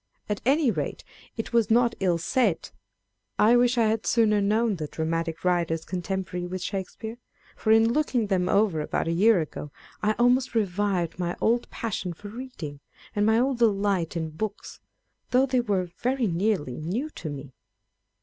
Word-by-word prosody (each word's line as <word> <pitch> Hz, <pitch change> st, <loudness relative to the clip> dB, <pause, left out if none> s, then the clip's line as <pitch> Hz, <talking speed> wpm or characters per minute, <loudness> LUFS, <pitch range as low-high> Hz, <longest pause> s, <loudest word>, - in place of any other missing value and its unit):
At 210 Hz, -1 st, -2 dB
any 280 Hz, -2 st, +4 dB
rate, 150 Hz, -7 st, -4 dB, 0.3 s
it 225 Hz, -, -5 dB
was 230 Hz, -3 st, +3 dB
not 235 Hz, +1 st, +4 dB
ill 180 Hz, -3 st, +2 dB
said. 205 Hz, +1 st, 0 dB, 0.7 s
I 225 Hz, +3 st, +5 dB
wish 245 Hz, +1 st, +4 dB
that 235 Hz, -, +3 dB
I -, -, +3 dB
had 220 Hz, 0 st, -1 dB
sooner 215 Hz, -3 st, +3 dB
known 215 Hz, +1 st, +1 dB
the 155 Hz, -2 st, -4 dB
dramatic 165 Hz, +2 st, -3 dB
writers 170 Hz, -2 st, +1 dB
contemporary 180 Hz, -1 st, -3 dB
with 185 Hz, +1 st, -5 dB
Shakespeare; 220 Hz, +4 st, -5 dB, 0.4 s
for 220 Hz, -, 0 dB
in 225 Hz, +1 st, +5 dB
looking 260 Hz, -6 st, +1 dB
them 185 Hz, -3 st, 0 dB
over 200 Hz, -6 st, +2 dB
about 150 Hz, -, -2 dB
a -, -, +1 dB
year 195 Hz, +2 st, +4 dB
ago, 150 Hz, -1 st, -6 dB, 0.3 s
I 210 Hz, +1 st, +2 dB
almost 245 Hz, +2 st, +2 dB
revived 195 Hz, -4 st, 0 dB
my 175 Hz, -1 st, -2 dB
old 235 Hz, +2 st, +1 dB
passion 195 Hz, -6 st, -3 dB
for 205 Hz, +5 st, -10 dB
reading, 210 Hz, -, -7 dB, 0.4 s
and 205 Hz, 0 st, +2 dB
my 220 Hz, 0 st, +4 dB
old 255 Hz, +1 st, +1 dB
delight 200 Hz, -6 st, +1 dB
in 160 Hz, -1 st, -3 dB
books, 205 Hz, +6 st, -5 dB, 0.5 s
though 255 Hz, +2 st, +4 dB
they 255 Hz, -2 st, +1 dB
were 190 Hz, -6 st, -1 dB
very 255 Hz, 0 st, 0 dB
nearly 175 Hz, -, 0 dB
new 220 Hz, -, -3 dB
to 160 Hz, -, -6 dB
me. 140 Hz, -2 st, -8 dB
205 Hz, 170 wpm, -26 LUFS, 175-230 Hz, 0.7 s, I